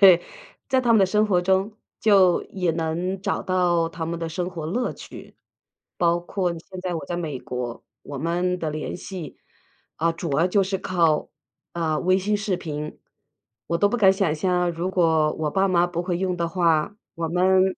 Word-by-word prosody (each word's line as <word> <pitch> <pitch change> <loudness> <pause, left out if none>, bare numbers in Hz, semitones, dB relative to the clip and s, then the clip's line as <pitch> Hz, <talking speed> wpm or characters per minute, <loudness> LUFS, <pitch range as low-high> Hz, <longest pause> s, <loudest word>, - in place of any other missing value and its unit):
对， 185 -4 +8 0.5
在 260 -2 +3
他 235 -1 +3
们 220 - +6
的 190 - +5
生 210 +2 +2
活 180 -4 +3
中 190 +3 +1 0.3
就 195 -5 +5
也 180 -3 -1
能 170 +4 -2
找 - - -1
到 175 -3 +2
他 165 0 -5
们 170 0 -3
的 165 -1 -3
生 180 +2 -3
活 165 -4 -5
乐 240 +9 -1
趣。 - - -12 0.6
包 170 -1 +2
括 180 +1 -2
现 185 +2 -10
在 180 -1 -2
我 160 - -4
在 175 - -3
美 155 -6 -3
国， 125 -1 -5 0.2
我 140 -1 -7
们 175 +4 0
的 160 - -2
联 155 0 -4
系， 180 -5 -8 0.6
啊， 165 +1 +2
主 165 -4 -3
要 170 - +4
就 195 +2 +2
是 190 0 -1
靠， 170 -5 +1 0.4
啊， 160 -3 -1
微 185 +1 +3
信 210 +2 0
视 205 -3 -1
频。 150 -3 -6 0.7
我 170 - 0
都 205 - +4
不 245 - -1
敢 195 -4 +6
想 190 -5 +1
象， 180 +1 +1
如 170 +3 -2
果 160 -4 +3
我 155 -1 -2
爸 195 +4 +2
妈 175 -1 +3
不 175 -1 -3
会 175 -1 -2
用 185 -1 -1
的 170 -1 -1
话， 165 +2 +1 0.2
我 165 -1 -3
们 185 +2 +4
175 Hz, 210 characters per minute, -24 LUFS, 165-190 Hz, 0.7 s, 对